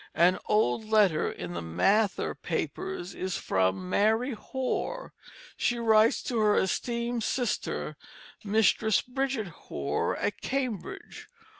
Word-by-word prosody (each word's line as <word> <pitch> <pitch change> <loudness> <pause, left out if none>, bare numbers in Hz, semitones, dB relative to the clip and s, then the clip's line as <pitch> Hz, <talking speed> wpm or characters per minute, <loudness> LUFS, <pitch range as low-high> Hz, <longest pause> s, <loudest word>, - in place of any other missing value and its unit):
An 175 +2 +4
old 210 - +2
letter 210 -7 +3
in 90 0 -6
the 85 - -4
Mather 195 - +1
Papers 370 - -4
is 185 -1 -3
from 95 0 0
Mary 220 - +2
Hoar. 265 - -3 0.4
She 240 - 0
writes 225 -1 +4
"To 240 -3 -1
her 210 -1 +4
Esteemed 235 +4 -1
Sister, 245 0 -2 0.5
Mistris 220 0 +3
Bridget 255 -5 -2
Hoar 70 - -3
at 205 -1 -2
Cambridge." 265 - -4
215 Hz, 115 wpm, -28 LUFS, 180-240 Hz, 0.5 s, An